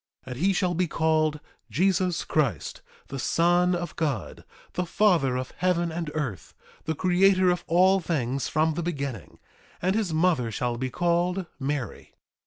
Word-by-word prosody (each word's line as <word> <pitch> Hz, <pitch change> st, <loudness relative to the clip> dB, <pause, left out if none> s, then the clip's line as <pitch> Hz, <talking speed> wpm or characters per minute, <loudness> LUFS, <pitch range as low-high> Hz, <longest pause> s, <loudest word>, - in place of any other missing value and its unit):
3:8 130 Hz, -, -8 dB
And 125 Hz, -, -6 dB
he 190 Hz, +4 st, +3 dB
shall 185 Hz, -1 st, +1 dB
be 175 Hz, +1 st, 0 dB
called 155 Hz, -1 st, +1 dB, 0.3 s
Jesus 185 Hz, 0 st, +1 dB
Christ, 130 Hz, -, -1 dB, 0.3 s
the 135 Hz, -, -5 dB
Son 175 Hz, +6 st, +2 dB
of 175 Hz, 0 st, -5 dB
God, 140 Hz, -, -3 dB, 0.3 s
the 180 Hz, -1 st, -2 dB
Father 165 Hz, -11 st, +2 dB
of 130 Hz, 0 st, -5 dB
heaven 175 Hz, 0 st, +1 dB
and 165 Hz, -1 st, -4 dB
earth, 130 Hz, -, -4 dB, 0.3 s
the 160 Hz, -, -1 dB
Creator 185 Hz, +2 st, +4 dB
of 175 Hz, -1 st, -2 dB
all 185 Hz, +3 st, +4 dB
things 140 Hz, -6 st, -2 dB
from 160 Hz, 0 st, +1 dB
the 170 Hz, -, -3 dB
beginning; 140 Hz, -, -5 dB, 0.4 s
and 185 Hz, +2 st, +1 dB
his 215 Hz, -6 st, 0 dB
mother 160 Hz, -7 st, +2 dB
shall 120 Hz, +2 st, -2 dB
be 130 Hz, +2 st, -3 dB
called 175 Hz, +4 st, 0 dB
Mary. 135 Hz, -2 st, -4 dB
165 Hz, 160 wpm, -26 LUFS, 140-180 Hz, 0.4 s, Creator